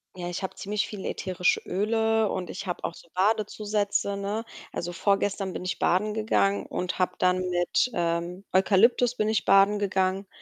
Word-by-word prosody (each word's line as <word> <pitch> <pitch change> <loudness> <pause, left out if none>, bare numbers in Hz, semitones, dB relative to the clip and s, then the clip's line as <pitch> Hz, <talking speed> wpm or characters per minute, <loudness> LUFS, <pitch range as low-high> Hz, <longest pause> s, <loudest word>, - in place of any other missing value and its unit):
Ja, 175 -1 -5
ich 175 +2 -5
habe 190 - -3
ziemlich 210 +1 -2
viele 205 -3 -6
ätherische 180 -1 0
Öle 220 +2 +1
und 185 -1 -3
ich 195 +1 -6
habe 175 - -4
auch 170 - -2
so - - -15
Badezusätze, 205 0 0
ne? 205 +3 -3 0.3
Also 175 - -3
vorgestern 195 +1 0
bin - - -5
ich 185 - -3
baden 210 +4 +2
gegangen 215 -2 +1
und 180 +1 -4
habe 185 - +1
dann 180 0 +3
mit, 175 +7 +1
ähm, 170 +2 -2
Eukalyptus 225 +6 +4
bin 215 -1 0
ich 220 -4 0
baden 200 +1 +5
gegangen. 190 0 0
195 Hz, 175 wpm, -26 LUFS, 185-210 Hz, 0.3 s, baden